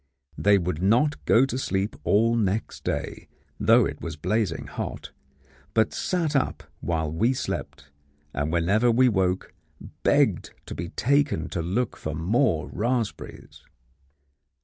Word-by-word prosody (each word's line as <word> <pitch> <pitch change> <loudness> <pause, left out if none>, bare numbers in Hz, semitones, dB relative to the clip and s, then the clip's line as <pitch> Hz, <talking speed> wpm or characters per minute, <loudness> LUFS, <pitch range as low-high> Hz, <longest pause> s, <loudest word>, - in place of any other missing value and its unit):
They 100 0 +4
would 90 -3 -2
not 125 +10 +2
go 125 +4 +5
to 130 -1 -3
sleep 100 -4 -1
all 115 +3 +3
next 105 -1 -1
day, - - -4 0.3
though - - +5
it - - -5
was - - -5
blazing 110 -2 -1
hot, - - -6 0.6
but 110 -2 +3
sat 165 -5 -1
up 135 - 0 0.2
while 80 -3 -1
we 115 +11 +2
slept, 70 - -5 0.4
and 75 +2 -1
whenever 100 +8 +2
we 125 +2 +4
woke 95 -3 0 0.5
begged - - +2
to - - -7
be 85 0 -5
taken 135 - +1
to 85 - -3
look 100 +8 -1
for 80 -1 -5
more 85 - +1
raspberries. 120 0 -3
105 Hz, 135 wpm, -25 LUFS, 85-125 Hz, 0.6 s, go